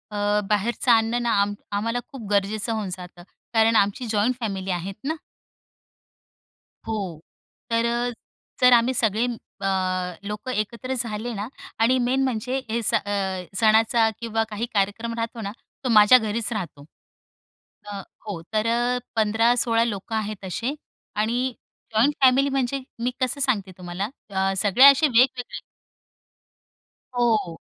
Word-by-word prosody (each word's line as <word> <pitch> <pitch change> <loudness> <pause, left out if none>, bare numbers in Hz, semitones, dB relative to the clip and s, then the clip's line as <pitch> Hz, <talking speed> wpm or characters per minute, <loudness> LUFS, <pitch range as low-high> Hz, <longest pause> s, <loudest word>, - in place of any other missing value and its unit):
अ, 205 0 +1
बाहेरचं 220 +4 +1
अन्न 230 +1 +3
ना, 235 - +1
आम 205 0 0 0.2
आम्हाला 230 +4 -1
खूप 255 -7 -9
गरजेचं 205 +3 0
होऊन 215 -3 -3
जातं, 180 -1 -11 0.3
कारण 225 0 +4
आमची 205 +4 +2
जॉइंट 220 +4 +2
फॅमिली 195 -5 -3
आहेत 180 +2 -3
ना. 310 +4 -1 1.7
हो, 195 -8 -4 0.5
तर, 235 +1 0 0.5
तर 250 0 +7
आम्ही 240 +2 +4
सगळे 220 -1 +1 0.4
अ, - - -3 0.6
लोकं 210 +5 -5
एकत्र 235 +3 -3
झाले 235 -1 -2
ना 205 0 -4 0.3
आणि 250 +3 +4
मेन 255 +2 +1
म्हणजे 255 0 -1
हे 230 +2 0
सण - - +3
अ, 190 -2 -2
सणाचा 225 +1 +4
किंवा 225 -1 -1
काही 215 +2 -3
कार्यक्रम 205 +3 0
राहतो 230 0 -4
ना, 200 -2 -4 0.3
तो 255 - -1
माझ्या 215 +2 +8
घरीच 220 0 -2
राहतो. 170 -9 -6 1.0
अ, 205 -1 -6 0.3
हो. 190 -6 -4
तर 215 +1 +1 0.5
15-16 230 +2 +3
लोकं 215 -1 -4
आहेत 215 -2 -3
असे 235 - -3 0.4
आणि 240 +4 0 0.4
जॉइंट 250 +7 +4
फॅमिली, 265 +2 +5
म्हणजे 270 0 -1 0.2
मी 250 - +1
कसं 255 +2 0
सांगते 215 -8 +1
तुम्हाला, 180 +3 -4 0.2
अ, 195 -1 0
सगळे 210 +6 +6
असे 280 +2 +7
वेगवेगळे. 250 0 +2 1.6
हो. 225 -8 +1
225 Hz, 135 wpm, -24 LUFS, 205-245 Hz, 1.7 s, माझ्या